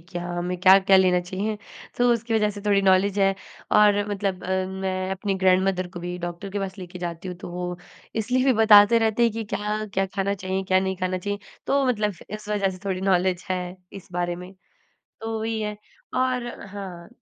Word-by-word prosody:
क्या 175 Hz, -1 st, -4 dB
हमें 175 Hz, +1 st, -2 dB
क्या-क्या 190 Hz, +1 st, +7 dB
लेना 185 Hz, -1 st, +4 dB
चाहिए, 195 Hz, +4 st, -3 dB, 0.4 s
तो 245 Hz, 0 st, +4 dB
उसकी 230 Hz, 0 st, -1 dB
वज़ह 210 Hz, -1 st, +3 dB
से 205 Hz, 0 st, -8 dB
थोड़ी 200 Hz, -1 st, +3 dB
नॉलेज 195 Hz, +1 st, +3 dB
है 195 Hz, 0 st, +3 dB, 0.4 s
और 210 Hz, -1 st, +6 dB
मतलब 195 Hz, -2 st, -2 dB, 0.4 s
मैं 185 Hz, 0 st, -2 dB
अपनी 195 Hz, +1 st, -2 dB
ग्रैंडमदर 185 Hz, -1 st, +2 dB
को 175 Hz, -1 st, -9 dB
भी 175 Hz, +1 st, -4 dB
डॉक्टर 175 Hz, +3 st, -6 dB
के 205 Hz, -, -3 dB
पास 195 Hz, 0 st, -5 dB
लेके 180 Hz, -1 st, -8 dB
जाती 175 Hz, +1 st, -5 dB
हूँ, 180 Hz, -, -6 dB
तो 180 Hz, -, -9 dB
वो 180 Hz, 0 st, -4 dB, 0.4 s
इसलिए 250 Hz, +4 st, +1 dB
भी 270 Hz, -, +5 dB
बताते 210 Hz, +1 st, +8 dB
रहते 225 Hz, +1 st, +1 dB
हैं 230 Hz, -2 st, +4 dB
कि 225 Hz, +1 st, -4 dB
क्या-क्या 210 Hz, -2 st, -1 dB
खाना 200 Hz, 0 st, 0 dB
चाहिए, 190 Hz, 0 st, -3 dB
क्या 185 Hz, 0 st, +3 dB
नहीं 190 Hz, 0 st, -2 dB
खाना 185 Hz, 0 st, -1 dB
चाहिए, 205 Hz, +2 st, -3 dB, 0.3 s
तो 275 Hz, 0 st, +2 dB
मतलब 210 Hz, -4 st, 0 dB, 0.2 s
इस 215 Hz, 0 st, -7 dB
वज़ह 205 Hz, -2 st, +1 dB
से 185 Hz, -, -9 dB
थोड़ी 190 Hz, -2 st, -2 dB
नॉलेज 185 Hz, -1 st, +1 dB
है 185 Hz, -1 st, 0 dB, 0.3 s
इस 195 Hz, -, -10 dB
बारे 175 Hz, 0 st, -1 dB
में। 180 Hz, +1 st, -10 dB, 0.7 s
तो 225 Hz, 0 st, -3 dB
वही 220 Hz, 0 st, -2 dB
है 210 Hz, -1 st, -3 dB, 0.4 s
और 255 Hz, -1 st, +1 dB, 0.2 s
हाँ, 190 Hz, -4 st, -8 dB
195 Hz, 195 wpm, -24 LUFS, 185-210 Hz, 0.7 s, बताते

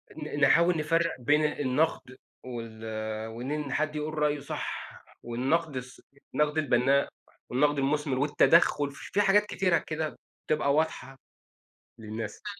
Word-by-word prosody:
ن 150 Hz, -1 st, -6 dB
ن -, -, -6 dB
نحاول 170 Hz, +5 st, +5 dB
نفرق 165 Hz, +2 st, +1 dB
بين 150 Hz, +5 st, +3 dB
النقد 145 Hz, -2 st, -1 dB, 0.3 s
وال 115 Hz, -3 st, -7 dB
آآ 110 Hz, 0 st, -4 dB
وإن 135 Hz, +5 st, -4 dB
حد 155 Hz, 0 st, -1 dB
يقول 150 Hz, +1 st, -3 dB
رأيُه 150 Hz, -1 st, +1 dB
صح، 140 Hz, -, -6 dB, 0.2 s
والنقد 135 Hz, +6 st, -1 dB
الص 125 Hz, 0 st, -8 dB, 0.3 s
النقد 150 Hz, +1 st, +1 dB
البَنّاء 140 Hz, -1 st, +2 dB, 0.4 s
والنقد 145 Hz, +4 st, +2 dB
المُثمِر 140 Hz, -1 st, 0 dB
والتدخل، 145 Hz, 0 st, +4 dB
في 200 Hz, +8 st, -2 dB
حاجات 205 Hz, +1 st, +4 dB
كتيرة 185 Hz, -4 st, +1 dB
كده 155 Hz, 0 st, -3 dB, 0.3 s
بتبقى 145 Hz, -2 st, +2 dB
واضحة 140 Hz, -4 st, -1 dB, 0.8 s
للناس. 110 Hz, -, -6 dB
145 Hz, 130 wpm, -28 LUFS, 125-155 Hz, 0.8 s, نحاول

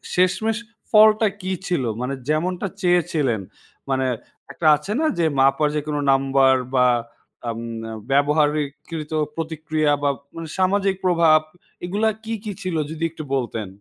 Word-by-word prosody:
শেষমেষ 190 Hz, +5 st, +2 dB, 0.3 s
ফলটা 215 Hz, 0 st, +6 dB
কি 185 Hz, +1 st, -3 dB, 0.2 s
ছিল? 175 Hz, -7 st, 0 dB, 0.2 s
মানে 125 Hz, +2 st, -2 dB, 0.2 s
যেমনটা 180 Hz, +5 st, 0 dB
চেয়েছিলেন, 165 Hz, -, +1 dB, 0.5 s
মানে 130 Hz, -1 st, +1 dB, 0.5 s
একটা 160 Hz, -, -1 dB
আছে 150 Hz, +7 st, -7 dB
না 320 Hz, -, +1 dB
যে 170 Hz, -, +3 dB
মাপার 135 Hz, +3 st, +4 dB
যেকোন 150 Hz, 0 st, -2 dB, 0.2 s
নাম্বার 135 Hz, 0 st, +4 dB, 0.2 s
বা 125 Hz, -1 st, +5 dB, 0.6 s
উম 115 Hz, -, -6 dB, 0.5 s
ব্যবহারকৃত 150 Hz, +2 st, 0 dB, 0.2 s
প্রতিক্রিয়া 155 Hz, -1 st, -1 dB
বা 145 Hz, -, +3 dB, 0.5 s
সামাজিক 195 Hz, +1 st, +2 dB
প্রভাব 165 Hz, -3 st, +5 dB, 0.5 s
এগুলা 205 Hz, +5 st, +1 dB
কি, 225 Hz, 0 st, -4 dB
কি 215 Hz, -, -4 dB
ছিল 185 Hz, -4 st, -3 dB, 0.2 s
যদি 160 Hz, +1 st, -5 dB
একটু 160 Hz, -1 st, -8 dB
বলতেন? 115 Hz, -5 st, -3 dB
155 Hz, 125 wpm, -22 LUFS, 140-185 Hz, 0.6 s, ফলটা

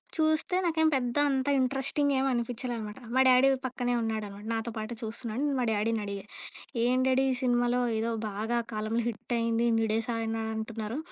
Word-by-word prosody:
చూస్తే 315 Hz, +2 st, +1 dB
నాకేం 320 Hz, -2 st, +2 dB
పెద్ద 245 Hz, 0 st, -1 dB
అంత 265 Hz, 0 st, 0 dB
ఇంట్రెస్టింగేం 270 Hz, +1 st, +1 dB
అనిపించలేదనమాట. 235 Hz, -2 st, -3 dB, 0.2 s
మా 260 Hz, -, +5 dB
డ్యాడీ 255 Hz, +1 st, +6 dB, 0.2 s
పక్కనే 245 Hz, -1 st, -1 dB
ఉన్నాడనమాట. 210 Hz, -2 st, -4 dB
నాతో 225 Hz, +1 st, -3 dB
పాటు 215 Hz, +2 st, -4 dB
చూస్తున్నాడు. 225 Hz, +2 st, -4 dB
నేను 280 Hz, -2 st, 0 dB
మా 245 Hz, -, +1 dB
డ్యాడీని 220 Hz, +1 st, 0 dB
అడిగా, 200 Hz, -1 st, -5 dB, 0.6 s
"ఏంటి 255 Hz, +2 st, +2 dB
డ్యాడీ 265 Hz, +1 st, +3 dB
ఈ -, -, +2 dB
సినిమాలో 245 Hz, -1 st, +2 dB, 0.2 s
ఏదో 230 Hz, +1 st, -1 dB, 0.2 s
బాగా 220 Hz, +4 st, -2 dB, 0.2 s
కాలంలో 215 Hz, +2 st, -1 dB
హిట్టయింది. 230 Hz, 0 st, -1 dB
ఇన్ని 225 Hz, 0 st, +2 dB
డేసాడినాడు 225 Hz, -1 st, -1 dB
అంటున్నారు. 220 Hz, +1 st, -4 dB
235 Hz, 150 wpm, -29 LUFS, 225-260 Hz, 0.6 s, డ్యాడీ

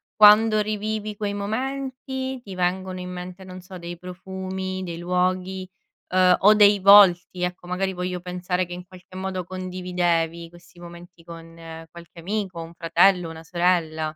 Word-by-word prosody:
quando 215 Hz, +1 st, +6 dB
rivivi 215 Hz, 0 st, -3 dB
quei 205 Hz, -1 st, -3 dB
momenti 260 Hz, +4 st, -4 dB
ti 195 Hz, -5 st, -9 dB
vengono 185 Hz, +1 st, -2 dB
in 180 Hz, 0 st, -6 dB
mente, 180 Hz, +1 st, -8 dB
non 185 Hz, 0 st, -10 dB
so, 185 Hz, +1 st, -11 dB
dei 175 Hz, 0 st, -7 dB
profumi, 190 Hz, +1 st, -6 dB
dei 170 Hz, -2 st, -6 dB
luoghi, 185 Hz, +1 st, -1 dB, 0.4 s
uhm, 185 Hz, 0 st, +4 dB
o 210 Hz, +2 st, +6 dB
dei 205 Hz, -1 st, +6 dB
volti. 185 Hz, -2 st, +6 dB
Ecco, 180 Hz, 0 st, -4 dB
magari 190 Hz, +1 st, -2 dB
voglio 180 Hz, 0 st, -4 dB
pensare 180 Hz, 0 st, -3 dB
che 175 Hz, -, -9 dB
in 180 Hz, 0 st, -9 dB
qualche 185 Hz, 0 st, -16 dB
modo 190 Hz, -1 st, -4 dB
condividevi 180 Hz, -2 st, -2 dB
questi 175 Hz, 0 st, -18 dB
momenti 175 Hz, 0 st, -13 dB
con 165 Hz, 0 st, -11 dB, 0.4 s
qualche 170 Hz, 0 st, -13 dB
amico, 190 Hz, -2 st, -3 dB
un 165 Hz, +1 st, -12 dB
fratello, 175 Hz, +1 st, +2 dB
una 160 Hz, 0 st, -10 dB
sorella. 170 Hz, -2 st, 0 dB
185 Hz, 155 wpm, -23 LUFS, 175-195 Hz, 0.4 s, quando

